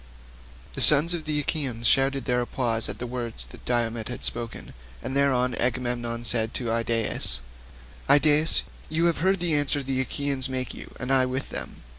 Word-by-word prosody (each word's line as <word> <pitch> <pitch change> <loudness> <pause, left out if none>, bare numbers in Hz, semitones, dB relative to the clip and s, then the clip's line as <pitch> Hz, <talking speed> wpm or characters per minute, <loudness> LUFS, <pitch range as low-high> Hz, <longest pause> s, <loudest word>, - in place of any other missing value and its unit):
The - - -4
sons 150 +4 +6
of 165 -3 -5
the 150 -1 -1
Achaeans 130 -6 -3
shouted 135 +1 +2
applause 120 -2 +3
at - - -5
the 125 - -5
words 120 -2 -4
that - - -15
Diomed 115 -2 -1
had 125 - -7
spoken, 115 0 -3 0.3
and 130 - -4
thereon 130 -3 +2
King - - -4
Agamemnon 120 -1 -2
said 115 -1 +1
to 120 -3 -2
Idaeus, 115 - -1 0.7
"Idaeus, 150 +2 +5 0.3
you 160 +2 0
have 170 -3 +1
heard 190 +3 +1
the 170 -2 0
answer 145 -1 +1
the 130 0 -1
Achaeans 135 +1 -2
make 130 -1 -4
you - - -11
and 125 +2 -1
I 130 -1 +3
with 130 +2 -4
them. - - -7
130 Hz, 175 wpm, -25 LUFS, 120-145 Hz, 0.7 s, sons